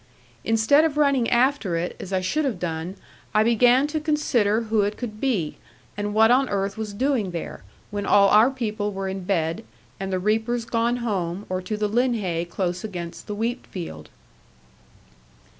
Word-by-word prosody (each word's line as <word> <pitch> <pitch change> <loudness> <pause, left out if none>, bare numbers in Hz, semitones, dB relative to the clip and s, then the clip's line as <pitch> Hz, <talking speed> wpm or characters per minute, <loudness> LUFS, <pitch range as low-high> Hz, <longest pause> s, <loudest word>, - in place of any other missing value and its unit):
Instead 225 +7 +4
of 310 -2 0
running 280 -5 +3
after 240 -7 +2
it, 175 +2 -3
as 195 - -7
I 190 -1 +1
should 295 +12 0
have 260 -9 -1
done, 170 +1 -4 0.4
I 215 - +5
began 245 +4 +4
to 305 +1 -2
consider 250 -9 +1
who 220 -1 +1
it 205 +1 -1
could 215 -4 -6
be, 210 - -1 0.4
and 205 0 -3
what 220 +1 +6
on 260 +1 +3
earth 195 0 -1
was 220 -1 -4
doing 245 -2 0
there, 170 - -6 0.3
when 205 -1 -3
all 200 -1 +6
our 215 +5 +6
people 215 -5 -3
were 195 -1 -4
in 190 -1 -5
bed, 175 +1 -1 0.4
and 195 0 -4
the 185 - +1
reapers 220 +4 0
gone 235 +1 0
home, 190 -3 -2
or 185 0 -2
to 210 +3 -4
the 210 0 0
linhay 210 -7 0
close 180 0 -2
against 175 -5 -6
the 210 - -4
wheatfield. 205 - -5
210 Hz, 175 wpm, -24 LUFS, 190-240 Hz, 0.4 s, what